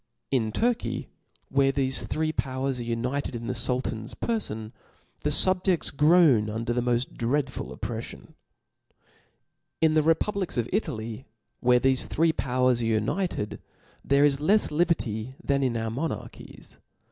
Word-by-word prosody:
In 115 -5 +1
Turkey, 240 - -1 0.4
where 135 0 +3
thefe 135 -1 +1
three 155 0 -1
powers 130 -2 -2
tfe 120 - -5
united 125 +4 -2
in 115 0 -5
the 125 - -2
Sultan's 120 -2 -2
perfon, 110 - -3 0.5
the 150 - -1
fiibjeds 180 0 +3
groan 150 -8 +5
ufvder 115 +2 -2
the 125 - 0
moft 120 +1 -1
dreadful 130 +2 -1
opprefflon. 115 -1 -7 1.5
In 160 -1 +3
the 155 - +4
republics 180 +5 0
ci 120 - 0
Italy, 115 - -3 0.3
where 125 0 +4
thefe 130 +1 +2
three 165 +1 +2
pow» 125 -2 0
ers 125 -2 +2
are - - -1
united, 115 - -1 0.4
there 140 +1 +4
is 140 -1 +1
left 205 +5 +3
liberty 130 -8 -1
than 140 0 +1
in 125 -3 0
our 110 0 -2
monarchies. 150 +8 -6
130 Hz, 140 wpm, -26 LUFS, 115-155 Hz, 1.5 s, groan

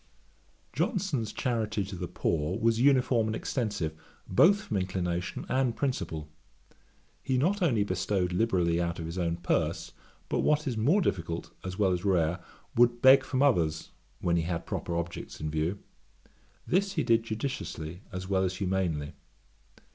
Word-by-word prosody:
Johnson's 170 - -1
charity 110 -4 -1
to 95 0 -7
the 90 0 -4
poor 80 +2 -1
was 115 0 +2
uniform 130 -4 +4
and 110 - -1
extensive, 100 - -2 0.3
both 195 - +5
from 200 - -2
inclination 90 -2 -2
and 130 -3 +1
principle. 85 - -2 0.9
He 130 -2 0
not 190 +10 +1
only 120 - +3
bestowed 95 -1 -1
liberally 90 -5 +2
out 85 -1 -2
of 80 - -5
his 85 +3 -5
own 85 -1 0
purse, 85 -1 -1 0.4
but - - -1
what 150 +1 +2
is 130 -4 -1
more 145 - +3
difficult 85 - -2
as 95 0 -5
well 100 -3 +3
as 90 0 -1
rare, 85 -3 +1 0.3
would 120 0 +3
beg 130 +1 +8
from 130 0 0
others, 80 - +1 0.3
when 85 -1 +2
he - - +2
had 85 0 -3
proper 85 - -3
objects 85 0 -5
in 75 0 -3
view. 80 +5 -1 0.9
This 195 +2 +1
he 160 - 0
did 115 -1 +4
judiciously 110 - -5
as 90 0 -5
well 95 -1 +2
as 95 0 -1
humanely. 90 -6 -1
95 Hz, 155 wpm, -29 LUFS, 85-125 Hz, 0.9 s, beg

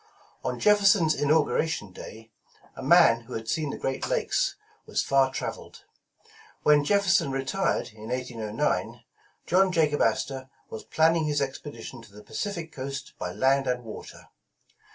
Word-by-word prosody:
On - - -3
Jefferson 200 -4 +5
's 155 - +3
Inauguration 150 - +1
Day, 110 +4 -11 0.4
a - - -8
man 135 -5 +5
who - - -10
had 110 0 -5
seen 155 +4 -1
the - - -5
Great 135 0 -3
Lakes - - 0 0.3
was - - 0
far 135 -1 +3
traveled. - - -6 0.8
Wlien 150 -1 +5
Jefferson 190 -4 +2
retired 135 - -1
in 110 +1 -10
1809, 120 -4 -2 0.4
John 190 +1 +3
Jacob 155 -4 +2
Astor 130 +4 0 0.2
was 110 - -7
planning 160 0 +2
his 145 -1 0
expedition 135 -3 -6
to 110 -3 -16
the 105 +1 -13
Pacific 170 - -5
coast 135 0 -6
by - - -3
land 135 +1 +2
and 125 -1 -1
water. 110 -2 -10
140 Hz, 145 wpm, -27 LUFS, 125-160 Hz, 0.8 s, Jefferson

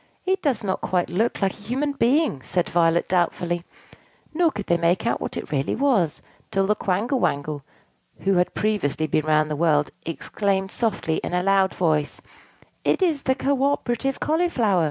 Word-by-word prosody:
"It 380 0 +1
does 255 -7 0
not 190 -2 -2
quite 180 -2 0
look 215 +3 0
like 195 - +2
a - - -12
human 250 +8 -2
being," 275 - +1
said 175 +6 -1
Violet 170 0 +2
doubtfully; 175 -1 0 0.7
nor 340 +1 +3
could 205 -8 -6
they 170 - +2
make 170 +2 +1
out - - 0
what - - -4
it - - -6
really 140 -2 0
was, 225 - +1 0.3
till 195 0 +1
the 210 - +3
Quangle 210 +9 0
Wangle 145 -5 -1 0.6
(who 195 - +2
had 180 - +1
previously 200 -8 0
been 155 0 0
round 155 0 +2
the - - 0
world) 150 -2 +2
exclaimed 195 +3 -2
softly 200 -10 -1
in 180 - -3
a 180 - +1
loud 195 0 +3
voice, 155 -4 0 0.6
"It - - +2
is 320 -6 +1
the 260 -1 +1
co 275 0 0
operative 270 -1 0
Cauliflower!" 300 - +1
195 Hz, 175 wpm, -23 LUFS, 170-255 Hz, 0.7 s, nor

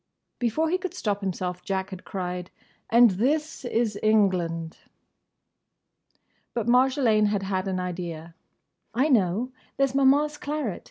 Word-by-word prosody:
Before 305 +7 0
he 365 - +1
could 370 -1 -5
stop 205 - -2
himself 180 -2 -3
Jack 190 +1 -2
had 185 -1 -9
cried 180 -1 -4 0.4
"And 235 -1 +7
this 290 +12 -1
is 225 -3 0
England!" 180 -6 +1 1.8
But 235 - -1
Marjolaine 250 -4 +4
had 205 -1 -1
had 190 0 -2
an 185 -1 -1
idea. 170 -2 -5 0.6
"I 270 +6 +2
know! 225 - +2 0.3
There 275 - +4
's 270 - -5
Maman's 285 +2 +3
claret. 290 - -3
215 Hz, 130 wpm, -26 LUFS, 185-265 Hz, 1.8 s, And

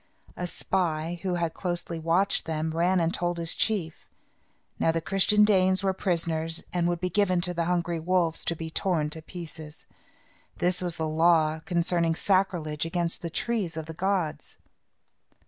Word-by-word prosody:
A 180 - -3
spy, 170 -2 -1
who 185 -2 -1
had 170 -2 -1
closely 175 -2 -3
watched 170 +5 +1
them, 160 0 -2
ran 175 +3 +2
and 165 0 +1
told 175 0 -1
his 165 0 +1
chief. 180 -8 -1 0.7
Now, 165 - +3
the 165 - 0
Christian 195 +5 +4
Danes 190 -2 +3
were 190 -1 +2
prisoners 165 -3 -1
and 175 -1 +1
would 175 -1 0
be 180 +1 -2
given 190 -4 +2
to 180 0 -1
the 170 -1 -1
hungry 175 -1 0
wolves 170 -1 +1
to 170 - +1
be 160 0 -6
torn 160 -4 0
to 160 - -4
pieces. 160 -2 -10 0.7
That 180 +1 0
was 175 -2 -3
the 160 - -1
law 160 0 +3
concerning 170 -2 +1
sacrilege 175 -6 0
against 170 0 -2
the 170 - -4
trees 200 -3 -2
of 160 - -4
the 160 - -7
gods. 185 -2 -2
170 Hz, 165 wpm, -27 LUFS, 160-185 Hz, 0.7 s, Christian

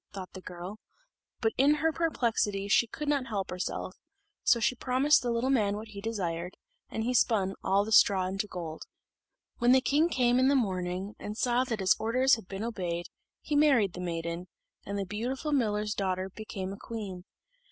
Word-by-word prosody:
thought 190 -2 -7
the 185 - -8
girl, 180 +4 -8 0.6
but 225 -2 +1
in 285 +3 +5
her 320 +2 +1
perplexity 230 -11 0
she 230 +3 +4
could 300 +6 -6
not 280 -3 +1
help 200 -4 -3
herself: 180 +1 -4 0.5
so 240 - +4
she 230 - +2
promised 260 +4 +3
the 245 - -2
little 235 +3 +1
man 210 -6 +2
what 215 +1 -7
he 200 -1 -8
desired, 180 -5 -3 0.3
and 220 - -3
he 245 +2 0
spun 200 -5 +2
all 200 +1 +2
the 220 - -6
straw 195 -3 +5
into 195 +3 -2
gold. 165 -4 -6 0.8
When 240 +1 +5
the 260 - +7
king 295 +5 +2
came 245 -4 +3
in 260 - +4
the 280 - +4
morning, 190 -3 -1
and 210 +1 -6
saw 245 +1 +2
that 225 -5 -3
his 185 - +4
orders 255 +4 +3
had 225 -5 +1
been 195 +2 -5
obeyed, 180 -7 -3 0.3
he 295 - -2
married 270 - +4
the 180 - -6
maiden, 170 0 -4 0.4
and 200 +1 -3
the 200 - -2
beautiful 245 +10 -3
miller's 210 -6 +1
daughter 190 -1 -2
became 195 -3 -5
a - - -8
queen. 200 -6 -6
210 Hz, 190 wpm, -29 LUFS, 190-250 Hz, 0.8 s, the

